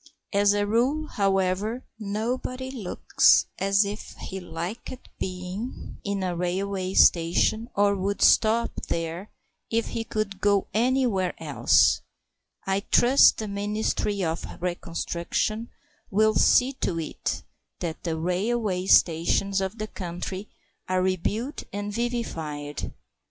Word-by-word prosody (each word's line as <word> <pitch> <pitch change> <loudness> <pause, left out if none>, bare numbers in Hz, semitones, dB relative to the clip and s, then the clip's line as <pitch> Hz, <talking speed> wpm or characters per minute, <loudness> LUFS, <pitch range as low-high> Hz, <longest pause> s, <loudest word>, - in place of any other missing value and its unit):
As 200 0 +4
a 205 0 +1
rule, 250 +9 +1
however, 195 +4 0
nobody 245 +5 -3
looks 225 -9 +3
as 195 +1 +3
if 205 +2 -6
he 190 - -6
liked 180 +9 -7
being 185 +5 -5
in 200 -1 -2
a 180 -1 -1
railway 185 +2 -2
station 180 +7 +4
or 200 0 +3
would 200 +1 -2
stop 230 +1 +4
there 165 +4 -3 0.4
if 230 0 0
he 230 - -3
could 215 -3 -3
go 200 -1 +3
anywhere 235 -5 +1
else. - - +3 0.6
I 195 0 +1
trust 255 +3 +6
the 215 - -4
Ministry 205 0 -1
of 165 0 -2 0.2
Reconstruction 175 +5 -2 0.4
will 215 +2 +3
see 255 +4 +4
to 170 -3 0
it 160 - -3 0.3
that 165 -3 -4
the 165 -2 -2
railway 185 +2 -1
stations 185 +4 +3
of 190 +3 -3
the 215 - -3
country 185 0 -6 0.4
are 185 0 +2
rebuilt 205 - -2
and 205 +1 -4
vivified. 160 - -3
200 Hz, 120 wpm, -26 LUFS, 180-220 Hz, 0.6 s, trust